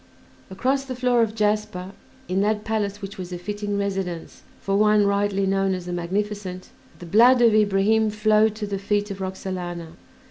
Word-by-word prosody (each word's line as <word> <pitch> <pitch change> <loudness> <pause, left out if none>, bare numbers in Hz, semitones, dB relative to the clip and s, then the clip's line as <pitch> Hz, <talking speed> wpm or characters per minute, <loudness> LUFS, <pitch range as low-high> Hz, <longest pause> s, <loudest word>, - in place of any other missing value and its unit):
Across 265 +8 -1
the 260 -1 -5
floor 250 -1 +2
of 220 -1 0
jasper, 210 -3 -1 0.4
in 185 +2 0
that 210 +1 0
palace 205 -2 -2
which 195 0 -7
was 180 -1 -6
a 180 - -4
fitting 205 +2 -4
residence 190 -4 -4 0.2
for 195 - -1
one 210 0 +4
rightly 200 -1 +1
known 195 0 +1
as 180 -1 -7
"The 180 - -4
Magnificent," 185 +1 -3 0.3
the 175 - -10
blood 235 +8 +5
of 235 -2 +5
Ibrahim 215 +1 +3
flowed 215 0 +2
to 215 -1 -4
the 200 -1 -4
feet 205 +1 -1
of 195 0 -6
Roxalana. 180 -3 -5
205 Hz, 175 wpm, -23 LUFS, 190-215 Hz, 0.4 s, blood